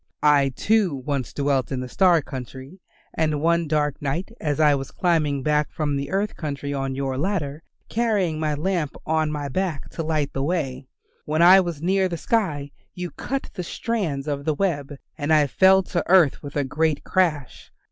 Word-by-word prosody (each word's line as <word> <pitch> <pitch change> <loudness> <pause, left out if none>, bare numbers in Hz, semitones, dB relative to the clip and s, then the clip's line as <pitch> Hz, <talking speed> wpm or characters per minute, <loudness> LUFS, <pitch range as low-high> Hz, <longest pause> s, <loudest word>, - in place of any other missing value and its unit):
I, 145 -2 +5
too, 210 -5 +2
once 135 -1 -3
dwelt 140 -3 0
in 130 - -2
the 130 - -5
star 175 +2 +3
country, 130 +6 -8 0.3
and 155 -2 0
one 170 +1 +2
dark 150 -2 0
night 165 +9 -2
as 150 -1 -1
I 150 -2 +5
was 135 -1 -3
climbing 155 -6 0
back 150 0 +1
from 150 -3 -1
the 140 0 -3
earth 200 +2 -1
country 145 -2 -4
on 135 -1 -2
your 135 -1 -2
ladder, 155 -5 -2 0.3
carrying 205 -9 0
my 155 -1 0
lamp 160 -1 -1
on 155 -1 +1
my 145 -1 -3
back 165 0 -3
to - - -4
light 155 -3 -1
the 135 - -2
way, 135 -4 -2 0.4
when 155 +2 +2
I 185 +2 +9
was 170 -5 -3
near 190 +1 +2
the 170 - -3
sky 155 -9 -1 0.2
you 180 -1 -5
cut 270 +1 -4
the 185 - -4
strands 170 -7 -3
of 140 -1 -2
the 155 -2 +1
web 145 -6 -1 0.2
and 145 +1 -1
I 155 -2 +5
fell 190 +6 +5
to - - -16
the 175 - -1
earth 175 -6 +5
with 145 -1 -9
a 145 - +1
great 150 +2 0
crash. 160 -8 -1
150 Hz, 190 wpm, -23 LUFS, 140-175 Hz, 0.4 s, I